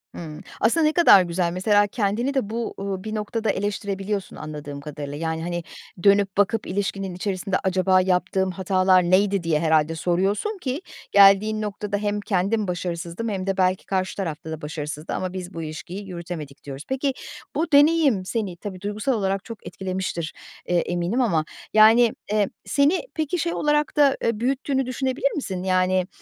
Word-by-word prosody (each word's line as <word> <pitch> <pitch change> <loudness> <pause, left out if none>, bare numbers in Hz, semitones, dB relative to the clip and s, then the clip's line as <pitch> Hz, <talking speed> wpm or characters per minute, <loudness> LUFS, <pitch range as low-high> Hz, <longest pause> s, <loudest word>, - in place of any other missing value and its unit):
Hımm. 155 -3 -8 0.2
Aslında 305 +9 +3
ne 305 - +3
kadar 320 - +7
güzel. 175 0 -1
Mesela 205 +3 +3
kendini 220 +5 -1
de 265 -7 -1
bu, 230 +1 -3
uuu, 195 -1 -4
bir 215 0 -4
noktada 215 +1 -2
eleştirebiliyorsun 200 0 -2
anladığım 145 -2 -7
kadarıyla. 145 -1 -6
Yani, 160 0 -2
hani, 175 0 -3 0.4
dönüp 200 -1 +4
bakıp 205 +2 +1
ilişkinin 195 -1 -2
içerisinde, 190 0 -2
"Acaba 185 0 +3
yaptığım 185 +1 +1
hatalar 185 0 +3
neydi?" 190 +2 +2
diye 160 -2 +1
herhâlde 160 0 +2
soruyorsun 195 - 0
ki 280 -3 -3 0.3
geldiğin 200 +2 +6
noktada 210 -1 -3
hem 205 0 -1
kendim 205 +1 0
başarısızdım 175 +3 -3
hem 195 -2 -3
de 195 -1 0
belki 185 0 +1
karşı 190 -1 -1
tarafta 160 -4 -4
da 160 - -6
başarısızdı 150 +1 -5
ama 185 -1 -3
biz 185 0 -6
bu 165 - -5
ilişkiyi 175 +6 -7
yürütemedik 170 -5 -7
diyoruz. 140 0 -7
Peki 270 +1 0 0.4
bu 320 +1 -1
deneyim 290 - +4
seni 195 -4 -3
tabii, 185 0 -7
duygusal 210 +6 -1
olarak 195 -3 -1
çok 230 -2 -9
etkilemiştir, 185 -4 -4 0.3
eee, 175 - +1
eminim. 175 +8 0
Ama, 170 -10 +1 0.3
yani, 225 +2 +6 0.2
eee, 210 -2 +2 0.2
seni 290 +6 +2
peki 315 +2 -1
şey 340 +1 -1
olarak 295 0 0
da, 280 -2 +5
eee, 230 -2 0
büyüttüğünü 270 +2 0
düşünebilir 260 +2 -1
misin? 190 -11 -3
Yani, 185 0 +2
195 Hz, 160 wpm, -23 LUFS, 175-220 Hz, 0.4 s, kadar